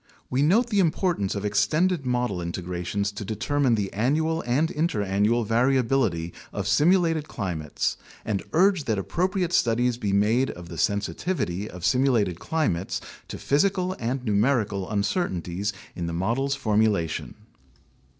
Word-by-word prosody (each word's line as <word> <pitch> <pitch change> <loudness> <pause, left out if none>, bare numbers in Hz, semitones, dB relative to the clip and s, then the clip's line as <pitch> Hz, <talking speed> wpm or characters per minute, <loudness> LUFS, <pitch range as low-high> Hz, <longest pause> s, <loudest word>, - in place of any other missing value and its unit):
We 130 +2 +1
note 220 +11 +3
the 205 - +2
importance 170 - +1
of 100 0 -3
extended 140 - +1
model 125 -7 0
integrations 90 +3 -3
to 105 +1 -6
determine 120 +5 +1
the 100 -3 -2
annual 155 +9 +1
and 135 +7 +2
interannual 110 - +1
variability 115 -7 +1 0.2
of - - -3
simulated 165 -2 +3
climates 80 -6 -3 0.3
and 105 -3 -1
urge 185 -2 +3
that 110 -3 0
appropriate 180 - -1
studies 120 -3 +2
be 105 -4 -2
made 110 +7 +2
of 90 -1 -8
the 85 - -8
sensitivity 100 - -1
of 90 -1 -7
simulated 110 -6 +2
climates 120 - -1 0.3
to - - -6
physical 185 +5 +1
and 125 +2 -2
numerical 105 -3 +1
uncertainties 100 - -1 0.2
in 85 -1 -3
the 85 - -3
models' 120 +11 0
formulation. 105 -8 0
115 Hz, 130 wpm, -25 LUFS, 100-150 Hz, 0.3 s, note